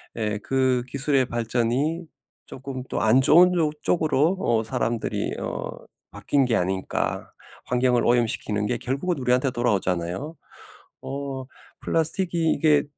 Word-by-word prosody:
예, 105 -2 -2
그 130 0 +1
'기술의 140 0 +2
발전이 120 +7 -1 0.4
쪼금 130 -1 -7
또 - - -2
안 110 +4 +5
좋은 175 +7 +6
조 160 -4 +1
쪽으로 160 +2 +1
어 115 -7 +1
사람들이 115 +1 -2
어 - - -4 0.4
바뀐 130 +7 +1
게 120 - +1
아닐까.' 95 0 -2 0.4
환경을 125 -1 +2
오염시키는 115 -3 +1
게 120 - -1
결국은 140 +7 -2
우리한테 125 +1 +1
돌아오잖아요. 100 - -1 0.7
어 135 -1 -5 0.4
플라스틱이 165 0 0
이게 150 -2 +3
130 Hz, 275 characters per minute, -24 LUFS, 115-150 Hz, 0.7 s, 좋은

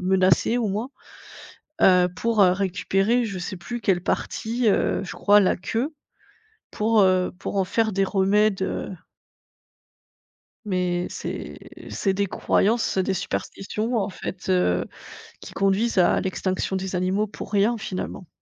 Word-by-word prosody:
menacé 185 +5 +3
au 230 -3 0
moins, 215 +7 -3 0.9
heu, 180 -1 +6
pour, 225 +1 +2
heu, 180 - +6
récupérer 195 +5 +1
je 195 -3 -5
sais 180 +1 -5
plus 240 +7 -6
quelle 185 -4 +1
partie, 230 +4 -1
heu, 200 - +1
je 175 - -7
crois 205 0 +4
la 185 - +2
queue 230 - -2 0.8
pour, 220 +1 +2
heu, 185 -1 +2
pour 200 - -5
en 195 - +2
faire 220 +3 0
des 195 +1 +2
remèdes, 195 +1 +2
heu - - -3 1.7
Mais, 180 -3 -1
c'est - - -6 0.3
c'est 195 -2 -1
des 200 +1 0
croyances, 215 +2 +1
des 190 +1 +1
superstitions 215 +5 -3
en 200 -3 0
fait, 185 0 -7
heu, 180 - +2 0.6
qui - - -10
conduisent 195 +4 +1
à 180 - +4
l'extinction 190 0 -2
des 190 0 -3
animaux 190 +4 0
pour 210 - -9
rien, 210 +4 +2
finalement. 190 -3 -6
195 Hz, 145 wpm, -24 LUFS, 185-215 Hz, 1.7 s, heu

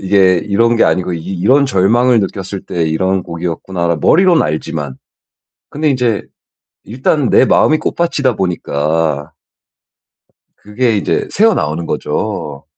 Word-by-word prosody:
이게 95 -1 +3
이런 115 +6 +1
게 - - +4
아니고 90 -1 0
'이 80 - -5
이런 130 +11 +3
절망을 120 +2 +3
느꼈을 95 0 -5
때 85 -2 -3
이런 95 +4 0
곡이었구나.' 85 0 -3
머리로는 175 - +4
알지만. 75 -3 -4 0.7
근데 150 +1 -1
인제 125 -5 0 0.6
일단 130 +4 0
내 - - +5
마음이 155 +3 +3
꽃밭이다 140 -8 -1
보니까 80 -4 -2 1.3
그게 110 +2 -1
이제 100 - -1
새어나오는 85 - +1
거죠. 70 -1 -4
95 Hz, 280 characters per minute, -15 LUFS, 85-125 Hz, 1.3 s, 내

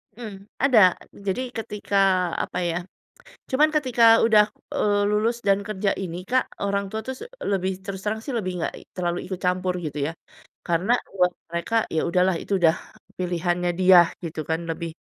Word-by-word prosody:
Mmm. 205 -4 -9 0.2
Ada, 260 -5 +6 0.5
jadi 195 +6 0 0.2
ketika, 210 -2 -3 0.5
apa - - -6
ya, 170 -1 -1 0.7
cuman 295 +4 +4
ketika 255 -6 +2 0.2
udah, 215 -2 +6 0.3
eee, 205 -1 +2
lulus 220 +3 +1
dan 195 0 +4
kerja 205 -1 0
ini 175 -3 -4
Kak, 255 +1 +2 0.2
orang 200 0 0
tua 220 +2 -4
tuh 260 - -2
s - - -19 0.3
lebih, 190 -1 0
terus 195 -1 -5
terang 215 +2 -2
sih 275 - -4
lebih 185 -4 -2
gak - - -2 0.2
terlalu 175 -1 -1
ikut 185 -1 -5
campur 180 0 +1
gitu 150 -1 -5
ya. 160 - -3 0.6
Karena, 175 +6 +2 0.2
buat 180 -1 +4 0.2
mereka, 170 +7 -2 0.2
ya 160 - +2
udahlah 180 +1 +2
itu - - -4
udah 165 0 +5 0.4
pilihannya 175 0 0
dia 185 -1 +8 0.2
gitu 160 -1 -5
kan, 160 - +1
lebih 165 +1 -4
190 Hz, 170 wpm, -24 LUFS, 175-215 Hz, 0.7 s, dia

